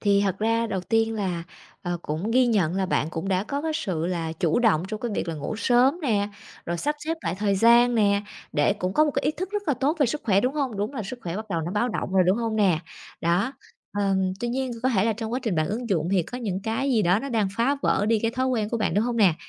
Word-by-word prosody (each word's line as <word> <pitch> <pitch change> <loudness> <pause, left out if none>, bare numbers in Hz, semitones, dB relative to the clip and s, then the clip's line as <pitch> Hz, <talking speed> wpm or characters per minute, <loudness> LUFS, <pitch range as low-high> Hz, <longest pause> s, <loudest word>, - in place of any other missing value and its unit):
Thì 200 -1 +3
thật 195 -1 -1
ra 230 +1 +1
đầu 190 -4 -2
tiên 225 +4 +1
là, 185 -5 -2 0.4
ờ, 175 -1 -2
cũng 160 +9 -3
ghi 255 +1 +4
nhận 190 -7 +2
là 190 -1 0
bạn 160 -3 0
cũng 165 +5 -4
đã 190 +1 +1
có 280 +5 -3
cái 320 - -1
sự 175 - -2
là 165 -3 -2
chủ 165 +1 +1
động 220 -9 +3
trong 215 0 -5
cái 240 - -2
việc - - -2
là 165 - -2
ngủ 150 +8 -4
sớm 255 +8 +3
nè, 205 -6 +1 0.4
rồi 170 0 -1
sắp 295 +1 0
xếp 325 +1 -1
lại 165 - -1
thời 200 -1 +1
gian 235 +3 +5
nè, 200 -2 +3 0.3
để 145 - +3
cũng 185 +1 -3
có 305 - +4
một 295 - +1
cái 275 - -2
ý 295 - +2
thức 370 +5 -5
rất 415 0 -2
là 285 - +3
tốt 280 +6 0
về 280 - +5
sức 295 +6 -2
khỏe, 200 -3 +3
đúng 255 +5 0
hông? 265 -8 -1
Đúng 210 +8 -2
là 225 - -3
sức 240 +6 -7
khỏe 170 0 -4
bắt 220 +1 -5
đầu 170 -3 0
nó 170 +2 -4
báo 225 +4 +1
động 190 - -3
rồi, 190 - +5
đúng 185 - +4
hông 230 -2 -1
nè? 190 -6 +3 0.4
Đó, 175 +10 +1 0.5
ờm, 190 -2 +1
tuy 240 - -1
nhiên 260 +1 -2
có 260 - +3
thể 205 -5 +2
là 225 - +2
trong 220 +1 -5
quá 255 - 0
trình 220 -7 -1
bạn 155 -1 +1
ứng 230 +3 -3
dụng 165 -4 0
thì 185 - +3
có 245 +9 -7
những 195 -5 -3
cái 225 +5 -1
gì 225 -4 +3
đó 180 +3 +3
nó 275 - -5
đang 220 -6 +1
phá 265 +5 +2
vỡ 205 - +2
đi 225 -1 +3
cái 225 +1 0
thói 255 +2 -1
quen 225 -5 0
của 235 - -1
bạn, 215 -3 0
đúng 210 +3 +2
hông 240 -1 -1
nè? 190 -7 +5
215 Hz, 290 wpm, -25 LUFS, 185-245 Hz, 0.5 s, gian